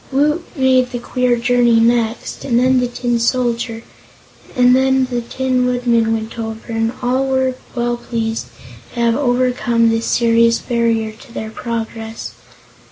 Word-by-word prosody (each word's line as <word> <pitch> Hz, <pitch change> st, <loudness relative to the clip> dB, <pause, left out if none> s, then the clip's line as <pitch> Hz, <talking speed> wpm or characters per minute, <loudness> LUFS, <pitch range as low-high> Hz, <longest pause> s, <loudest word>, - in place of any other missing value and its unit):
Woot 300 Hz, +5 st, +1 dB
made 260 Hz, -2 st, +3 dB
the 250 Hz, -, -4 dB
queer 250 Hz, 0 st, 0 dB
journey 240 Hz, -1 st, +3 dB
next, 230 Hz, 0 st, 0 dB
and 235 Hz, -3 st, +1 dB
then 255 Hz, +1 st, +3 dB
the 250 Hz, -, 0 dB
Tin 240 Hz, -1 st, -1 dB
Soldier 235 Hz, -1 st, -1 dB, 0.7 s
and 250 Hz, -1 st, +5 dB
the 260 Hz, -2 st, +1 dB
Tin 255 Hz, +1 st, -1 dB
Woodman 240 Hz, -2 st, +1 dB
went 225 Hz, +1 st, -3 dB
over, 225 Hz, +1 st, -6 dB
and 225 Hz, 0 st, 0 dB
all 260 Hz, +2 st, +1 dB
were 260 Hz, -1 st, +1 dB, 0.2 s
well 240 Hz, 0 st, -1 dB
pleased 225 Hz, -, -3 dB, 0.5 s
to -, -, -4 dB
have 235 Hz, -1 st, +2 dB
overcome 245 Hz, -3 st, +1 dB
this 225 Hz, 0 st, -1 dB
serious 230 Hz, 0 st, +3 dB
barrier 230 Hz, -2 st, 0 dB
to 230 Hz, +4 st, -16 dB
their 220 Hz, -1 st, -6 dB
progress. 225 Hz, -1 st, -5 dB
240 Hz, 145 wpm, -17 LUFS, 230-255 Hz, 0.7 s, and